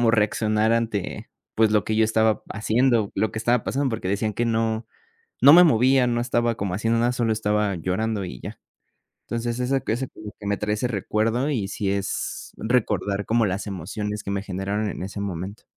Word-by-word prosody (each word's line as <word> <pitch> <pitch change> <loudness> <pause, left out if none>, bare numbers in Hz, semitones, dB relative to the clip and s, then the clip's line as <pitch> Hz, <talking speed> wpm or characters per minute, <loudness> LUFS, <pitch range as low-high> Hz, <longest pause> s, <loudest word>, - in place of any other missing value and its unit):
cómo 115 -1 +4
reaccionar 110 0 +2
ante 115 -4 -2 0.3
pues, 110 -1 +3
lo 105 - +3
que 110 - -1
yo 110 - +4
estaba 110 0 +2
haciendo, 110 0 +1
lo 110 +2 0
que - - -4
estaba 120 +1 +2
pasando. 135 -1 0
Porque 110 -5 -3
decían 105 +2 0
que 120 - 0
no 115 0 0 0.6
no 140 - +10
me 180 +1 +9
movía, 130 -2 +4
no 120 0 0
estaba 120 -1 0
como 95 -2 -3
haciendo 115 +3 +1
nada. 120 +1 +2
Solo 115 -2 0
estaba 105 -2 0
llorando, 100 +5 -1
y - - -8
ya. - - -8 0.7
Entonces 120 +1 -2
eso 125 +2 +1
ese 110 - +1 0.5
que 105 - -7
me 100 0 +1
trae 105 0 -1
ese 120 +4 -1
recuerdo. 115 +5 0
Y 105 -9 -1
si 100 -1 -2
es 100 -1 -3
recordar, 105 -4 0
como 115 0 +2
las 95 +2 -3
emociones 105 +3 -4
que 100 - -4
me 100 0 -2
generaron 100 +2 -2
en - - -6
ese 100 +1 -6
momento. 100 +1 -5
110 Hz, 195 wpm, -24 LUFS, 100-115 Hz, 0.7 s, no